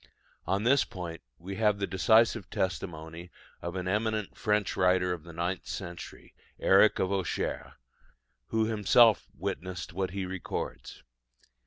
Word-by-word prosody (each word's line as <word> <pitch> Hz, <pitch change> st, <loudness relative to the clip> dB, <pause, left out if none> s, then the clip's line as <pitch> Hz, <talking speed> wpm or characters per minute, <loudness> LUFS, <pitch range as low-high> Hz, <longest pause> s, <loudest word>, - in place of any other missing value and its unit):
On 95 Hz, +4 st, +1 dB
this 130 Hz, +4 st, +4 dB
point 85 Hz, -3 st, -7 dB, 0.2 s
we 95 Hz, +3 st, -7 dB
have 105 Hz, -2 st, +3 dB
the 100 Hz, -, -1 dB
decisive 110 Hz, +1 st, +3 dB
testimony 85 Hz, -2 st, -4 dB, 0.3 s
of 85 Hz, +1 st, -5 dB
an 90 Hz, -1 st, -3 dB
eminent 110 Hz, +1 st, -1 dB
French 105 Hz, -1 st, 0 dB
writer 90 Hz, -1 st, +3 dB
of 85 Hz, -, -6 dB
the 85 Hz, -, -11 dB
ninth 85 Hz, +3 st, -3 dB
century, 85 Hz, -3 st, -7 dB, 0.3 s
Eric 100 Hz, +3 st, +5 dB
of 95 Hz, -, 0 dB
Auxerre, 95 Hz, -5 st, -2 dB, 0.7 s
who 110 Hz, 0 st, +1 dB
himself 110 Hz, 0 st, +4 dB
witnessed 90 Hz, -1 st, -4 dB
what 95 Hz, +1 st, -1 dB
he 95 Hz, 0 st, -4 dB
records. 95 Hz, -1 st, -5 dB
95 Hz, 135 wpm, -29 LUFS, 90-105 Hz, 0.7 s, Eric